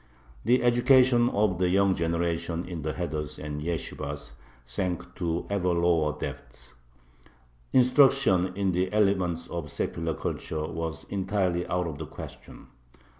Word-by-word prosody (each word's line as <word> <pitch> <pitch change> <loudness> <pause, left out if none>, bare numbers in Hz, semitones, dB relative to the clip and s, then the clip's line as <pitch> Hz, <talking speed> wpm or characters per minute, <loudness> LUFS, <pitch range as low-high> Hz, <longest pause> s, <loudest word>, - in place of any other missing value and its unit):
The 125 0 +3
education 120 0 +5
of 100 -5 +1
the 90 -1 +2
young 95 0 +3
generation 85 0 -1
in 85 -3 -5
the 75 +1 -2
heders 75 -4 -4
and 75 0 -5
yeshibahs 75 -3 -4 0.3
sank 90 +9 -2
to 85 -1 -2
ever 100 -3 0
lower 85 -3 +2
depths. 60 -4 -8 1.0
Instruction 125 -8 +4
in 100 -1 +1
the 90 +1 0
elements 95 -5 +1
of 85 -3 -5
secular 80 +2 -2
culture 75 -1 -3
was 80 -1 -4
entirely 95 -3 0
out 90 0 0
of 75 -4 -5
the 80 - -5
question. - - -11
90 Hz, 130 wpm, -27 LUFS, 80-100 Hz, 1.0 s, education